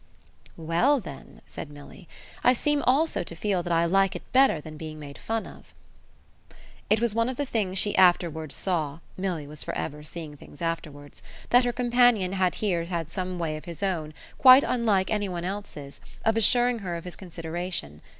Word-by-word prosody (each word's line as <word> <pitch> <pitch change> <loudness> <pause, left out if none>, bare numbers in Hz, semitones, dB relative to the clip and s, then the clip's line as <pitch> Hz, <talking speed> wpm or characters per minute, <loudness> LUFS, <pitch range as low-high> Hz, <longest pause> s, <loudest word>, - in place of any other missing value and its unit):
"Well 170 - +2
then," 140 - -11
said 155 - -8
Milly, 145 +3 -13 0.4
"I 250 - +6
seem 295 +3 +1
also 295 +6 +2
to 170 - -8
feel 195 -1 0
that 175 0 -5
I 165 0 +3
like 195 +2 +2
it - - -6
better 265 - +5
than 155 +1 -10
being 155 0 -7
made 145 -2 -10
fun 225 0 -2
of." - - -14 1.1
It 215 - +4
was 235 -2 +1
one 230 +2 +1
of 260 - -5
the 285 - -1
things 200 -7 -2
she 205 +1 +1
afterwards 165 -5 +3
saw 160 -6 -1 0.2
Milly 180 -5 -3
was 150 +1 -9
for - - -5
ever 150 0 -4
seeing 155 0 -8
things 145 - -15
afterwards 150 -4 -5 0.3
that 245 +1 +6
her 245 - +1
companion 240 -6 +3
had 185 -2 +1
here 175 -6 -1
had 170 -3 -4
some 185 -1 -4
way 165 -3 -2
of 155 - -11
his 170 +2 -7
own, 160 -6 -2 0.2
quite 260 +1 +9
unlike 215 -6 +1
any 205 -2 0
one's 175 -1 -4
else, 180 -8 -7 0.2
of 225 - +3
assuring 240 +2 +4
her 180 -4 -4
of 170 - -6
his 180 - -8
consideration. 170 - -5
180 Hz, 190 wpm, -26 LUFS, 160-220 Hz, 1.1 s, quite